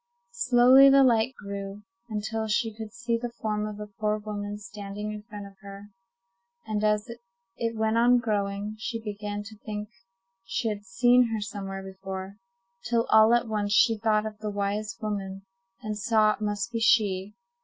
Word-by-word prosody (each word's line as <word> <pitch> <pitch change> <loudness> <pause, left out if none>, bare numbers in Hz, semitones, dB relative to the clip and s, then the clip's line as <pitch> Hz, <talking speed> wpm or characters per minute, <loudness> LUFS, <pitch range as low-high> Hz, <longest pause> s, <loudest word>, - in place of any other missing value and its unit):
Slowly 265 - +6
the 275 0 +7
light 240 0 +3
grew, 200 0 -7 0.3
until 220 +1 -3
she 220 +1 0
could 220 -1 -7
see 235 0 -2
the 240 0 -3
form 210 -1 -1
of 210 -1 -7
the 210 - -6
poor 210 0 +1
woman 205 -1 -5
standing 210 0 -6
in 210 0 -6
front 210 -2 -9
of 195 -1 -14
her; 200 0 -11 0.7
and 215 -1 -2
as 210 +1 +2 0.5
it 230 -1 -2
went 220 +1 +1
on 245 +1 +5
growing, 205 -2 -2
she 230 +1 -3
began 205 -1 -5
to 215 0 -12
think 210 -1 -6 0.5
she 195 +4 -2
had 205 -1 -5
seen 245 +5 +4
her 220 - -1
somewhere 195 -2 -5
before, 190 0 -7 0.5
till 235 -1 +2
all 220 +1 +7
at 240 0 0
once 205 -2 -1
she 225 +2 +5
thought 215 0 +1
of 215 -1 -6
the 215 -1 -3
wise 205 +2 -2
woman, 195 -2 -4 0.4
and 215 -1 -3
saw 215 -1 +3
it - - -11
must 205 -1 -2
be 230 - -2
she. 205 -3 +2
210 Hz, 175 wpm, -27 LUFS, 205-225 Hz, 0.7 s, the